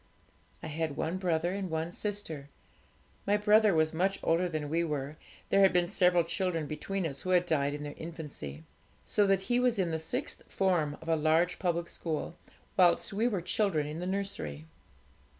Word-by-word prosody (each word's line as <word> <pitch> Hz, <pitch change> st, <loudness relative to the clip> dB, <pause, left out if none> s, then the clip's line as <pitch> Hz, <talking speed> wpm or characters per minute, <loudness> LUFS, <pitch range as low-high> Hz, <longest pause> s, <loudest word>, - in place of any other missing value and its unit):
'I -, -, -4 dB
had 155 Hz, -1 st, -3 dB
one 165 Hz, +3 st, -1 dB
brother 175 Hz, -2 st, 0 dB
and 195 Hz, -2 st, -3 dB
one 160 Hz, +1 st, -2 dB
sister. 175 Hz, -9 st, -4 dB, 0.8 s
My 205 Hz, +1 st, +4 dB
brother 210 Hz, 0 st, +5 dB
was 155 Hz, 0 st, +2 dB
much 190 Hz, +4 st, 0 dB
older 175 Hz, +2 st, +2 dB
than 155 Hz, -3 st, -3 dB
we 165 Hz, +3 st, +1 dB
were; 150 Hz, -2 st, -3 dB, 0.3 s
there 195 Hz, -, +4 dB
had 195 Hz, -1 st, +6 dB
been 180 Hz, -1 st, +3 dB
several 175 Hz, 0 st, +3 dB
children 170 Hz, -2 st, -1 dB
between 170 Hz, +6 st, -3 dB
us, 140 Hz, -4 st, -4 dB
who 185 Hz, -, -5 dB
had 180 Hz, -1 st, +4 dB
died 145 Hz, -4 st, +1 dB
in 150 Hz, -, -6 dB
their 145 Hz, 0 st, -5 dB
infancy, 150 Hz, -, -7 dB, 0.4 s
so 205 Hz, -1 st, +2 dB
that 195 Hz, -1 st, +3 dB
he 245 Hz, +5 st, +1 dB
was 250 Hz, -3 st, +2 dB
in 180 Hz, -4 st, +1 dB
the 160 Hz, -, -1 dB
sixth 160 Hz, -, -3 dB
form 170 Hz, -7 st, +1 dB
of -, -, -13 dB
a 165 Hz, -, +3 dB
large 160 Hz, +3 st, +2 dB
public 170 Hz, -2 st, 0 dB
school 160 Hz, -3 st, -4 dB, 0.4 s
whilst 180 Hz, +1 st, +4 dB
we 220 Hz, +4 st, +2 dB
were 200 Hz, -7 st, -1 dB
children 180 Hz, -5 st, +1 dB
in 150 Hz, +2 st, -5 dB
the 180 Hz, -, -3 dB
nursery. 185 Hz, -, -3 dB
170 Hz, 185 wpm, -31 LUFS, 155-190 Hz, 0.8 s, had